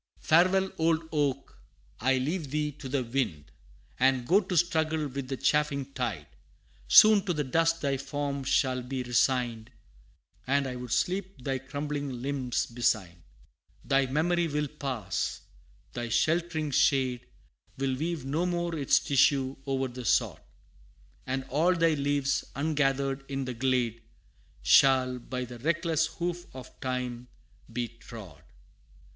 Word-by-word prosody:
Farewell, 185 +4 +3
old 160 0 +1
oak! 140 -3 -1 0.4
I 130 +2 +2
leave 150 +3 -2
thee 150 +1 -1
to 135 -1 -9
the 135 -1 0
wind, 115 - -3 0.5
And 130 -1 +3
go 190 +9 +4
to 185 -2 -3
struggle 160 -2 +1
with 135 -1 -5
the 135 0 -3
chafing 140 -2 0
tide - - -3 0.6
Soon 215 -3 +8
to 180 - 0
the 150 - 0
dust 165 +4 +1
thy 140 -2 0
form 140 0 -3
shall 130 -1 +1
be 130 +1 -4
resigned, 120 -2 0 0.8
And 140 +1 +2
I 130 -1 -4
would 125 -1 -7
sleep 185 +1 -1
thy 135 0 -1
crumbling 145 -1 -4
limbs 135 -3 -1
beside. 105 -8 -1 0.6
Thy 135 0 +2
memory 170 +5 +1
will 150 -1 -1
pass; 135 -6 -3 0.5
thy 120 -1 -4
sheltering 155 +3 0
shade, 130 -2 +2 0.5
Will 135 -1 0
weave 160 0 -3
no 155 +6 0
more 175 -1 -1
its 140 -4 +3
tissue 135 -1 +2
o'er 135 -1 0
the 125 0 -8
sod; - - +1 0.9
And 130 +1 -2
all 155 +7 +2
thy 165 -1 +3
leaves, 140 -1 0
ungathered 140 -2 0
in 135 -1 -2
the 125 - -4
glade, 120 -2 0 0.6
Shall, 130 - +5
by 125 +1 -5
the 120 0 -10
reckless 160 +2 +1
hoof 175 -1 -4
of 130 -1 -11
time, 125 -2 -3 0.4
be 120 +1 -2
trod. 110 - -12
135 Hz, 140 wpm, -28 LUFS, 125-155 Hz, 0.9 s, Soon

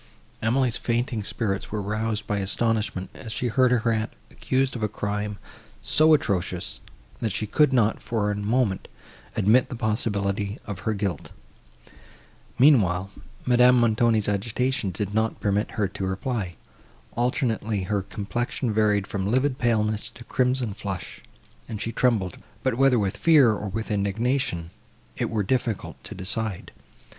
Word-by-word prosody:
Emily's 120 +1 +2
fainting 120 -1 -1
spirits 100 -2 -2
were 105 - -2
roused 105 +1 -2
by 105 - -1
astonishment, 105 -1 0
as 115 -5 -8
she 125 +2 -1
heard 130 +2 +4
her 120 -2 +2
aunt 110 -1 -1 0.2
accused 130 0 0
of 120 - -5
a 105 - +2
crime 105 0 -3 0.4
so 155 0 +5
atrocious, 100 -11 -1 0.4
and 110 - 0
she 110 - -2
could 145 +7 +3
not, 115 -4 +2
for 105 -3 -1
a - - -1
moment, 105 0 0 0.5
admit 115 +6 +4
the 125 - -5
possibility 105 -3 -1
of 100 -3 -5
her 110 - 0
guilt. 100 -3 -3 1.3
Meanwhile 100 - +4 0.3
Madame 125 0 +6
Montoni's 115 -2 +3
agitation 115 +3 0
did 100 +3 -3
not 110 +1 0
permit 105 0 0
her 105 -2 +1
to 95 -1 -4
reply; 95 -2 -3 0.6
alternately 115 -4 0
her 100 +2 0
complexion 115 +4 -3
varied 105 -2 +2
from 100 0 -2
livid 130 +3 +1
paleness 110 -3 +1
to 120 - -13
a - - -7
crimson 125 -2 0
flush; 100 -3 -6 0.5
and 110 - -4
she 115 - -2
trembled,—but, 115 +2 -1
whether 135 +1 +4
with 100 -3 0
fear, 150 -8 +6
or 105 -1 -4
with 110 +3 -4
indignation, 100 - 0 0.4
it - - -1
were 110 -2 0
difficult 115 0 -2
to - - -7
decide. 100 +1 -3
110 Hz, 145 wpm, -25 LUFS, 100-120 Hz, 1.3 s, Madame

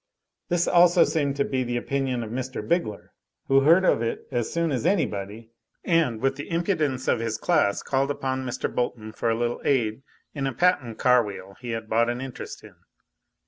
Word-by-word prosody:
This 175 -1 +1
also 175 0 +6
seemed 140 -4 0
to 140 - +1
be 130 -1 -1
the 120 0 -2
opinion 130 -1 -1
of 110 - -7
Mr. 130 +2 -4
Bigler, 170 - -1 0.3
who 135 0 +5
heard 170 +7 +5
of 115 - +3
it 115 - -3
as 120 -2 -1
soon 170 -1 0
as 130 - -1
anybody, 115 - -1 0.3
and, 160 -10 +1
with 135 +2 0
the 145 - -7
impudence 160 -6 -1
of - - +2
his 115 -1 -2
class 155 - +1
called 135 +1 0
upon 130 -2 -2
Mr. 130 0 -2
Bolton 115 -3 -2
for 115 - -2
a 115 - +2
little 120 0 -2
aid 120 -4 +1 0.3
in 140 -2 -2
a 135 - -2
patent 145 -9 +1
car 125 -1 +4
wheel 100 -2 -8
he 125 - -8
had 115 -1 -4
bought 115 +2 +2
an 120 +1 -2
interest 130 -1 -7
in. - - -15
130 Hz, 195 wpm, -25 LUFS, 115-150 Hz, 0.3 s, also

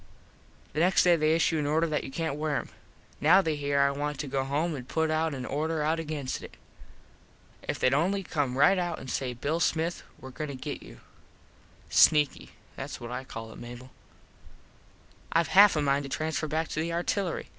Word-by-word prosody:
The 150 - -2
next 180 +3 +4
day 175 -1 +5
they 155 0 +2
issue 165 -1 +2
an 145 - -1
order 160 +3 +2
that 155 -2 -1
you - - -6
cant 160 +1 -2
wear 150 0 -1
em. - - -3 0.5
Now 170 +6 +6
they 160 -5 0
hear 145 -1 0
I 140 0 +4
want 145 +1 -3
to 150 - -6
go 135 0 -1
home 150 +5 -1
an 125 -3 -7
put 160 +3 0
an 155 -5 -1
order 155 +3 -1
out 160 +2 +1
against 150 -4 -4
it. - - -11 1.0
If - - -4
theyd 130 - +3
only 190 +7 +1
come 140 -7 -2
right 150 +7 +5
out 175 -2 -2
an 130 - -9
say 125 0 -2
Bill 145 +7 -2
Smith 165 +1 0 0.2
were 130 - -10
goin 155 +4 -5
to 140 - -6
get 130 - -6
you. - - -13 0.9
Sneaky. 150 -2 +4 0.3
Thats - - -6
what 120 0 -7
I 125 +1 -4
call 115 -3 -8
it, - - -11
Mable. 120 +2 -10 1.4
Ive 165 -1 +2
half 200 0 +7
a 150 - +1
mind 140 0 +2
to 140 - -7
transfer 155 +2 -2
back 160 +2 -1
to - - -3
the 165 +2 -1
artillery. 175 +2 -2
150 Hz, 200 wpm, -28 LUFS, 140-165 Hz, 1.4 s, half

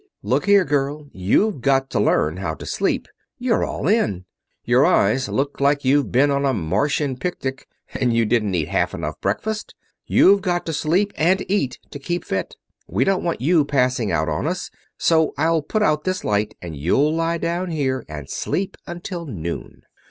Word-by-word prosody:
"Look - - 0
here, 200 -2 +5
girl; 145 +1 -1
you've 125 - +1
got 135 0 +2
to - - 0
learn 80 +3 +2
how 85 -4 -3
to - - -10
sleep. - - -1 0.3
You're 245 -2 +1
all - - -3
in. 105 - +1 0.4
Your - - +4
eyes 115 +7 +3
look 140 +1 -2
like 140 0 +2
you've 140 +2 +2
been 140 +3 +4
on 140 0 +1
a 135 -2 +2
Martian 110 - 0
picnic 135 -2 -4 0.3
and 125 -2 +1
you 115 0 +2
didn't 105 -4 +1
eat 80 -4 -1
half - - 0
enough - - -5
breakfast. 220 0 -2 0.3
You've 200 +1 +5
got 175 -2 -1
to 165 - -3
sleep 180 +8 +1
and 185 +4 +2
eat 185 -11 0
to 145 - -7
keep 175 +5 -3
fit. 95 -1 -3 0.3
We 100 +9 +1
don't 190 +5 +1
want 170 -6 -2
you 160 +3 +4
passing 125 -6 +1
out 80 +1 0
on 80 - -1
us, 180 +2 -3 0.3
so 160 -2 +2
I'll 160 +2 +2
put 215 +8 -1
out 150 -4 +2
this 185 0 -2
light, 105 0 0
and 85 -3 -6
you'll 135 - +2
lie 165 +1 0
down 170 +2 -2
here 135 -6 -1
and 75 -3 -7
sleep 195 +1 -3
until 175 -1 -6
noon." 85 - -6
145 Hz, 185 wpm, -21 LUFS, 115-175 Hz, 0.4 s, here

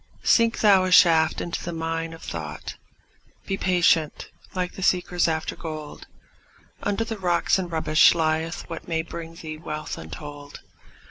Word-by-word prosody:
Sink 230 -1 +3
thou 200 -3 +6
a 185 - -1
shaft 165 -3 +5
into 170 - -4
the 175 - -4
mine 165 0 -3
of 165 - -11
thought; 75 -3 -6 0.7
Be 195 - -1
patient, 175 -4 +1 0.2
like 180 -1 -2
the - - -9
seekers 180 -2 +2
after 160 -1 -2
gold; 155 -3 -8 0.7
Under 205 +2 0
the 225 -2 -5
rocks 175 0 +2
and 180 -2 -4
rubbish 155 0 +4
lieth 160 0 -1
what 165 -1 -8
May 165 -2 -1
bring 165 0 -8
thee 155 -2 -7
wealth 155 -1 -5
untold. 145 - -9
165 Hz, 150 wpm, -24 LUFS, 155-180 Hz, 0.7 s, thou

